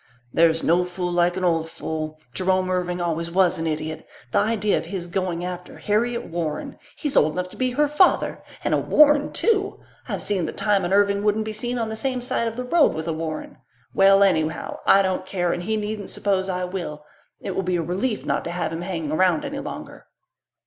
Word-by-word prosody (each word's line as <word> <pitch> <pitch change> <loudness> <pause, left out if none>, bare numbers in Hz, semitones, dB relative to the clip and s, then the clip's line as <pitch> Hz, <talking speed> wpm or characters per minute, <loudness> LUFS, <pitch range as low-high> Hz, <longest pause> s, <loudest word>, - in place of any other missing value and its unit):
"There's 165 0 +3
no 175 +2 +3
fool 180 0 -3
like 175 +1 +2
an 185 - -2
old 165 -2 +1
fool. 155 -1 -5
Jerome 185 0 +1
Irving 180 -1 -1
always 170 -1 -1
was 180 -1 +2
an 165 - -2
idiot. 155 0 -4 0.2
The - - +3
idea 215 -2 +1
of - - -7
his 175 0 -5
going 175 -1 -2
after 180 0 -7
Harriet 235 +3 0
Warren! 165 -3 -4 0.2
He's 295 -3 -3
old 155 +1 +4
enough 180 +1 -3
to - - -13
be 255 -1 0
her 295 +3 +3
father. 300 +6 +3 0.2
And - - 0
a - - +3
Warren, 295 -1 +4
too! 405 -3 +1 0.3
I've - - -3
seen 190 -6 0
the - - -4
time 205 -2 +1
an 175 - -2
Irving 200 0 +3
wouldn't 210 +1 +1
be 215 - -4
seen 240 +3 -3
on 225 -2 -1
the 220 - -4
same 255 +2 -2
side 235 -1 0
of 225 - -4
the 250 - -3
road 295 - +3
with 160 +1 -4
a 165 - 0
Warren. 155 -1 -5 0.4
Well, 195 +1 +6
anyhow, 160 -5 0
I 195 - +6
don't 185 -1 -1
care, 175 -2 -1
and 175 - -3
he 220 +5 -1
needn't 210 -1 -4
suppose 195 -2 0
I 180 -1 -1
will. 170 -5 -5 0.3
It - - -5
will - - -1
be 185 -1 -1
a 170 - 0
relief 195 +8 -2
not - - 0
to - - -3
have 175 -1 -2
him 165 - -4
hanging 170 -5 -3
around 175 0 +2
any - - -4
longer." - - -8
185 Hz, 220 wpm, -23 LUFS, 170-210 Hz, 0.4 s, Well